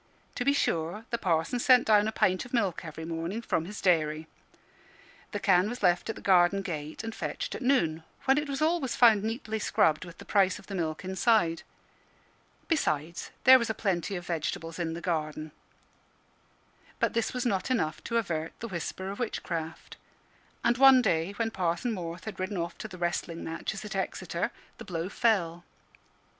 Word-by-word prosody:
To - - -2
be 280 - +4
sure, 175 - -1
the 235 - -1
Parson 170 +4 0
sent 250 0 +5
down 210 -1 +4
a - - 0
pint 185 -3 +1
of 245 +1 -4
milk 195 -8 0
every 160 -1 -7
morning 165 +5 -3
from 165 -8 -1
his 205 +3 -7
dairy; 155 -3 +2 1.1
the 205 - -3
can 190 0 +3
was 245 -1 -6
left 180 +3 +3
at 225 - -2
the - - -11
garden 190 +1 +4
gate 155 -1 -5
and 225 0 -5
fetched - - -4
at - - -6
noon, 170 - +2 0.2
when 270 +2 +4
it 295 -1 -4
was 275 +2 -1
always 315 -5 +1
found 220 -4 +6
neatly 220 -1 -3
scrubbed, 155 -6 +2
with 175 -1 -11
the - - -11
price 195 -2 +3
of 210 - -14
the 200 - -8
milk 165 -1 -3
inside. 190 -3 +2 1.1
Besides, 165 - -1
there 260 +1 +9
was 235 - -2
a 220 - -1
plenty 190 -2 -1
of 175 -1 -5
vegetables 165 0 -3
in 165 -1 -2
the 170 - -6
garden. 155 -3 -2 1.5
But - - +1
this 230 -1 0
was 250 0 -3
not 195 -1 0
enough 165 -12 -1
to 235 - 0
avert 165 -7 -2
the 230 - -5
whisper 190 +1 -4
of 200 - -8
witchcraft. 170 -8 -4 0.7
And 240 +1 +2
one 265 -2 +8
day, 165 +1 +1
when 225 +2 -1
Parson 180 +4 -1
Morth 170 -4 -5
had 220 - -7
ridden 185 +1 -2
off 170 0 -3
to - - -5
the 185 -3 -10
wrestling 175 -1 -2
matches 180 +6 -4
at 210 - -6
Exeter, 190 - -2 0.3
the - - -7
blow 170 -1 -4
fell. 175 -7 +1
190 Hz, 185 wpm, -29 LUFS, 165-225 Hz, 1.5 s, there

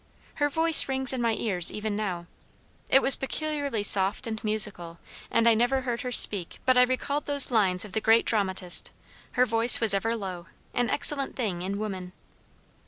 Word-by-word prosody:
Her 290 -2 -1
voice 320 +1 +5
rings 265 -1 -2
in 255 - -4
my 230 -2 -1
ears 185 -7 +1
even 210 0 -6
now. 185 -5 -5 0.6
It 270 - +3
was 270 - +7
peculiarly 285 -5 -4
soft 200 +3 +1
and 220 0 -7
musical, 205 -6 0 0.3
and 230 0 0
I 230 - +4
never 245 +4 -1
heard 240 -2 -5
her 250 -2 -6
speak 200 -6 +1
but 255 0 +2
I 250 - +4
recalled 255 +3 -2
those 285 -2 +5
lines 190 -4 +1
of 210 - -13
the 220 - -4
great 225 +1 +2
dramatist, 190 -4 -2 0.4
'Her 250 - +1
voice 230 +1 +5
was 225 -4 +4
ever 225 +4 -2
low, 185 -5 -8 0.3
an 245 -2 -2
excellent 280 -1 -1
thing 200 -9 -5
in 195 +2 -5
woman.' 190 -4 -7
225 Hz, 180 wpm, -25 LUFS, 195-260 Hz, 0.6 s, was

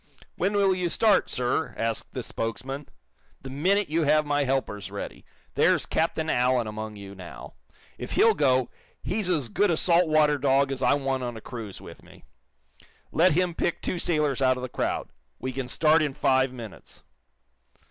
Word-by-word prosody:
"When 195 +3 0
will 200 -2 +3
you 180 -1 -1
start, 215 +2 +3
sir?" 125 +5 -1
asked 115 -1 -3
the - - -3
spokesman. 135 +5 -5 0.5
"The 135 - -7
minute 190 +9 +1
you 160 +3 0
have 155 0 +3
my 145 -1 +1
helpers 130 -7 -2
ready. - - -7 0.3
There's - - +3
Captain 160 0 -1
Allen 125 -3 +2
among 110 0 -6
you 100 -1 -10
now. 90 -3 -10 0.5
If - - -5
he'll 225 - +5
go, 130 - +2 0.3
he's 210 -4 -1
as 155 -8 +1
good 205 - +1
a 165 - +1
salt 175 0 +4
water 150 -2 +3
dog 135 0 +2
as 135 -1 -4
I 135 - +4
want 135 -2 -1
on 120 -2 -4
a - - -7
cruise 110 -5 -8
with - - -12
me. - - -18 0.9
Let 170 +1 +4
him 180 +1 +1
pick 170 - -1
two 180 - -3
sailors 150 -6 0
out 130 -1 +3
of 125 - -6
the 130 - -4
crowd. - - -2 0.3
We 130 - -4
can 130 0 -4
start 155 +5 +3
in 145 -3 -1
five 130 0 +2
minutes." 115 -5 -11
140 Hz, 180 wpm, -26 LUFS, 125-165 Hz, 0.9 s, he'll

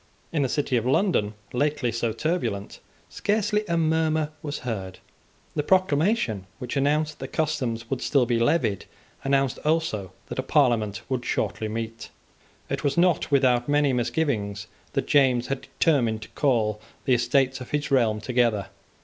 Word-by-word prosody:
In 160 - 0
the 135 - +1
City 140 -2 0
of 115 - -1
London, 130 - +2 0.2
lately 140 -1 0
so 115 0 -1
turbulent, 115 - -2 0.3
scarcely 210 0 0
a 170 -1 0
murmur 160 -1 +1
was 150 -1 -4
heard. 95 -6 -4 0.6
The - - +1
proclamation, 155 - +1
which 125 -2 -5
announced 150 +2 +1
that 135 - -7
the - - -10
customs 130 -8 -1
would 135 - -1
still 140 -4 +3
be 115 0 +1
levied, 115 - +1 0.4
announced 135 -1 +1
also 150 - 0 0.2
that - - -4
a - - +3
Parliament 115 -6 +2
would 130 -2 -2
shortly 110 - -1
meet. 115 +1 -5 0.6
It - - -3
was 140 +1 0
not 175 -2 +3
without 130 -3 +3
many 145 -2 +3
misgivings 120 -5 -1 0.3
that - - 0
James 130 -4 +3
had 135 -1 -4
determined 120 -9 +2
to - - -12
call 110 -7 +1 0.2
the 130 - +3
Estates 130 +2 +2
of 125 - -8
his 150 -1 -2
realm 115 -5 +3
together. 115 -5 +1
130 Hz, 160 wpm, -25 LUFS, 115-150 Hz, 0.6 s, still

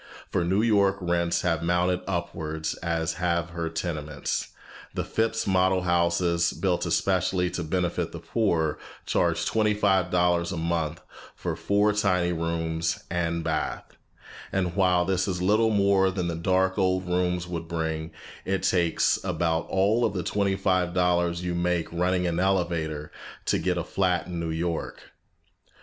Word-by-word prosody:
For - - +1
New 95 +5 +2
York 100 -4 +3
rents 85 -1 0
have 85 -3 +1
mounted 90 +1 +1
upwards 80 -4 -3
as 80 -1 -1
have 85 -1 0
her 85 -1 -3
tenements. 75 -3 -3 0.5
The - - -1
Phipps 115 0 -1
model 95 -1 +2
houses, 85 -1 +2
built 90 +1 0
especially 90 -1 +1
to 90 -1 -3
benefit 90 +2 -1
the - - -7
poor, 85 -9 0 0.3
charge - - +1
twenty 105 -1 +2
five 95 -4 +2
dollars 90 -1 +2
a 90 - -3
month 80 -1 -1 0.3
for - - -3
four 105 +1 +2
tiny 90 -4 +1
rooms 80 -1 -2
and 85 -1 -1
bath; 80 -2 -3 0.6
and 90 -3 -1
while 90 -2 +3
this 95 +1 0
is 90 -2 -2
a 90 - -1
little 110 +3 +4
more 100 -2 +3
than 90 -2 -2
the 85 - -2
dark 95 +3 +1
old 95 -1 +1
time 90 - -3
rooms 90 0 0
would 85 -2 -5
bring, 80 -1 -3 0.3
it 95 -1 -1
takes 85 -3 +2
about 85 -3 0
all 100 +5 +2
of 110 - +1
the 90 - -1
twenty 100 -1 0
five 90 -2 +1
dollars 90 -1 +1
you 90 -1 -2
make 85 -1 -1
running 90 +1 +1
an 85 -1 0
elevator, 85 -5 0 0.3
to - - +1
get - - 0
a - - -1
flat 90 -2 0
in 90 -1 -5
New 85 -1 -2
York. 80 +1 -4
90 Hz, 160 wpm, -26 LUFS, 85-95 Hz, 0.6 s, little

